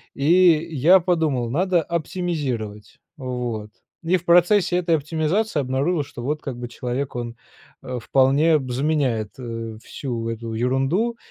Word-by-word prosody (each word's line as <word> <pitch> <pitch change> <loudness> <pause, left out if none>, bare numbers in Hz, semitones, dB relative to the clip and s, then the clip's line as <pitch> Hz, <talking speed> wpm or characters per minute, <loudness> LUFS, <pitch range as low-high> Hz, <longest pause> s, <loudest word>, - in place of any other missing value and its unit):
и 140 - -4 0.5
я 170 +8 +6
подумал: 160 -9 0
"Hадо 180 +4 +2
оптимизировать". 150 - -4 0.2
Вот. 125 -5 -4 0.3
И 170 +3 +2
в 175 - -2
процессе 175 +2 +4
этой 170 -2 +2
оптимизации 160 +6 -1
обнаружил, 140 +5 0
что 140 -4 -10
вот 150 +4 -2
как 130 -4 -5
бы 120 0 -6
человек 125 +2 -4
он, 120 -1 -5 0.5
а, 125 -1 -5
вполне 140 +6 +3
б 130 -3 -5
заменяет, 130 -6 0
э, 115 -3 -6
всю 115 -4 -4
эту 115 0 -5
ерунду 135 - 0
135 Hz, 140 wpm, -22 LUFS, 120-165 Hz, 0.5 s, я